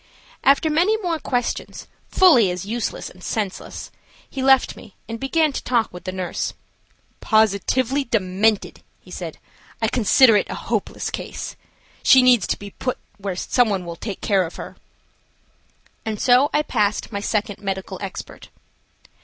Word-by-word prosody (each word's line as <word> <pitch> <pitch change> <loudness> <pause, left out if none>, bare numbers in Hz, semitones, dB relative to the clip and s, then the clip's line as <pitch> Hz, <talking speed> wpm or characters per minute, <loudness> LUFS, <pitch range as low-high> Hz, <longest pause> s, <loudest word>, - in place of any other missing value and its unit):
After 285 +3 +4
many 360 +8 +3
more 350 -6 -2
questions, 245 -4 -3 0.2
fully 300 - +6
as 180 +1 -4
useless 230 +2 -3
and 180 - -14
senseless, 205 -4 -4 0.4
he 270 - -5
left 265 0 +4
me 210 - -14
and 230 0 -6
began 305 +3 +1
to - - -3
talk 235 -3 0
with 180 - -10
the 185 - -2
nurse. 185 -2 -3 0.6
"Positively 225 +5 +2
demented," 210 -1 0 0.2
he - - -17
said. - - -6 0.4
"I 225 - +1
consider 235 +1 +5
it - - -1
a - - -4
hopeless - - -3
case. - - -6 0.5
She 260 -1 +6
needs 245 -6 +5
to - - -1
be 200 0 -9
put 255 +4 -3 0.2
where 195 -2 -3
some 245 +5 +2
one 190 -3 -2
will 170 0 -6
take 200 +2 -6
care 195 -2 +2
of 165 - -7
her." - - -8 1.3
And 215 -2 -4
so 255 +3 +4
I 300 - +2
passed 210 -6 0
my 200 - -3
second 210 -1 -2
medical 190 -2 -4
expert. 195 -2 -8
220 Hz, 155 wpm, -22 LUFS, 195-260 Hz, 1.3 s, fully